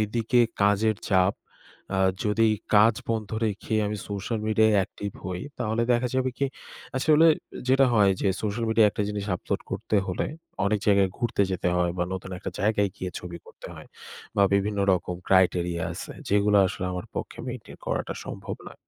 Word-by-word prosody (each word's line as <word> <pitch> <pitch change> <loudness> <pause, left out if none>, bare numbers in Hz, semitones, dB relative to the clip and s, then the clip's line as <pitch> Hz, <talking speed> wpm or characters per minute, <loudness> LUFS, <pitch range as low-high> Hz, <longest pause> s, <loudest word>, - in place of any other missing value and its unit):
এইদিকে 115 +3 +1 0.2
কাজের 105 +1 +3
চাপ। 95 +1 +4 0.6
আ - - 0 0.3
যদি 110 +1 +3 0.3
কাজ 105 +2 +6 0.2
বন্ধ 110 -2 -2 0.2
রেখে 105 +2 -3
আমি 105 +1 -2
social 100 +3 -3
media-য় 110 0 +4
active 100 +1 -7
হই 90 -1 -4 0.2
তাহলে 115 0 0
দেখা 120 +1 +1
যাবে 130 0 +1
কি? 140 - +2 0.5
আসলে 155 +4 +5 0.4
যেটা 135 0 +5
হয় 100 -3 +5
যে 100 - +2
social 110 +2 -1
media 110 -1 +5
একটা 105 - -2
জিনিস 105 -1 -3
upload - - -3
করতে 105 - -1
হলে 90 - -2 0.4
অনেক 105 +1 +2
জায়গায় 100 -2 +4
ঘুরতে 120 -4 +1
যেতে 90 -1 0
হয় 90 -1 +1
বা 90 - +1
নতুন 95 0 -7
একটা 95 - -5
জায়গায় 105 -1 +2
গিয়ে 90 -1 -4
ছবি 85 -1 -8
করতে - - -12
হয়। - - -12 0.5
বা 100 - +5
বিভিন্ন 100 +1 0
রকম 90 0 -1
criteria 90 -2 +3
আছে - - -7 0.2
যেগুলা 105 0 +4
আসলে 95 0 -5
আমার 90 0 -5
পক্ষে - - -5
maintain 125 -2 -8
করাটা - - -2
সম্ভব - - -6
না। - - -14
105 Hz, 170 wpm, -26 LUFS, 95-110 Hz, 0.6 s, কাজ